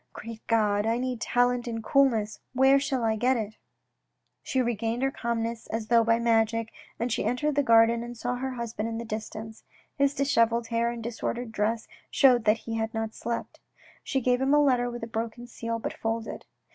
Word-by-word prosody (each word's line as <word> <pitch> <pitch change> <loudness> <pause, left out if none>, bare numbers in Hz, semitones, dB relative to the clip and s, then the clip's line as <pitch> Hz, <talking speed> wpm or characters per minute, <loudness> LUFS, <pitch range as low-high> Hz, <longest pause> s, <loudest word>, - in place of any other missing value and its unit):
Great 225 -1 -8
God! 210 -2 +2
I 230 +1 +2
need 250 -2 -3
talent 245 0 +1
and 225 -1 -4
coolness, 225 -5 +2
where 265 +2 +5
shall 265 -3 -1
I 220 -1 +2
get 250 +4 +2
it? 215 -1 -5 0.4
" - - -52
She 265 - -1
regained 235 0 -1
her 270 - +2
calmness 230 -2 -3
as 220 -1 -4
though 235 -1 +5
by 230 0 +3
magic, 230 -1 +1 0.2
and 235 +2 -2
she - - -1
entered 295 +5 0
the 285 - +3
garden 230 -2 +5
and 240 0 -7
saw 245 +2 -2
her 265 +1 -3
husband 230 -2 -3
in 225 - -4
the 235 - -5
distance. 220 0 -6 0.3
His 280 0 +2
dishevelled 230 -4 +2
hair 230 0 +1
and 235 -1 -5
disordered 235 +1 -4
dress 220 +2 -1 0.2
showed 250 -4 +4
that 215 +1 +4
he 225 -1 -3
had 225 +1 -2
not 225 0 -2
slept. 235 +1 -5 0.4
She 270 - -1
gave 250 +1 +2
him 275 +2 +3
a - - +6
letter 250 -3 +2
with 240 -1 -7
a - - -3
broken 230 +1 -4
seal 230 -1 -4
but 225 - -4
folded. 225 0 -4
230 Hz, 200 wpm, -27 LUFS, 225-245 Hz, 0.4 s, a